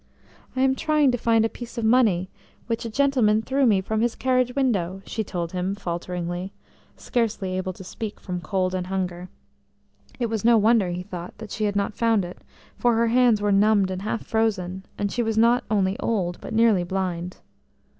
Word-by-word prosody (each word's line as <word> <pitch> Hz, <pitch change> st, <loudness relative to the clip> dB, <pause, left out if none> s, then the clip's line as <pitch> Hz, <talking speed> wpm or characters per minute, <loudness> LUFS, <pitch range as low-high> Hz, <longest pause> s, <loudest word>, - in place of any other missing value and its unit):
"I 260 Hz, -, 0 dB
am 265 Hz, 0 st, +4 dB
trying 300 Hz, 0 st, +2 dB
to 245 Hz, -, 0 dB
find 225 Hz, -1 st, +3 dB
a -, -, +3 dB
piece 240 Hz, +1 st, -10 dB
of 230 Hz, -, -1 dB
money, 220 Hz, -7 st, +3 dB, 0.3 s
which 230 Hz, 0 st, -3 dB
a -, -, -3 dB
gentleman 230 Hz, -4 st, +2 dB
threw 270 Hz, +1 st, +2 dB
me 200 Hz, -4 st, +4 dB
from 220 Hz, +3 st, -1 dB
his 235 Hz, 0 st, +1 dB
carriage 255 Hz, -1 st, +1 dB
window," 195 Hz, -9 st, 0 dB
she 220 Hz, -, -3 dB
told 170 Hz, -4 st, -4 dB
him 185 Hz, +2 st, -2 dB
falteringly, 175 Hz, 0 st, -4 dB, 0.4 s
scarcely 215 Hz, -6 st, -1 dB
able 185 Hz, 0 st, -2 dB
to 190 Hz, -, -11 dB
speak 215 Hz, +3 st, -6 dB
from 180 Hz, -2 st, -5 dB
cold 185 Hz, 0 st, -1 dB
and 180 Hz, -1 st, -2 dB
hunger. 180 Hz, -1 st, -3 dB, 0.9 s
It 240 Hz, -, +1 dB
was 220 Hz, -3 st, -2 dB
no 235 Hz, 0 st, +6 dB
wonder, 220 Hz, -3 st, +3 dB
he 175 Hz, +1 st, -4 dB
thought, 180 Hz, -2 st, -8 dB
that 220 Hz, -2 st, -9 dB
she 215 Hz, -, -1 dB
had 205 Hz, -1 st, -1 dB
not 200 Hz, +1 st, 0 dB
found 225 Hz, -4 st, +2 dB
it, 175 Hz, -, -9 dB, 0.4 s
for 240 Hz, -1 st, +2 dB
her 230 Hz, 0 st, +2 dB
hands 235 Hz, -3 st, +3 dB
were 205 Hz, -, +2 dB
numbed 200 Hz, -1 st, +3 dB
and 185 Hz, 0 st, -4 dB
half 215 Hz, +3 st, -3 dB
frozen, 190 Hz, -4 st, -1 dB
and 200 Hz, -1 st, -1 dB
she 245 Hz, -, -1 dB
was 225 Hz, -1 st, -1 dB
not 235 Hz, +3 st, +4 dB
only 195 Hz, -2 st, +1 dB
old, 180 Hz, -6 st, -1 dB
but -, -, -8 dB
nearly 220 Hz, -5 st, +4 dB
blind. 180 Hz, -1 st, -3 dB
210 Hz, 195 wpm, -24 LUFS, 185-230 Hz, 0.9 s, no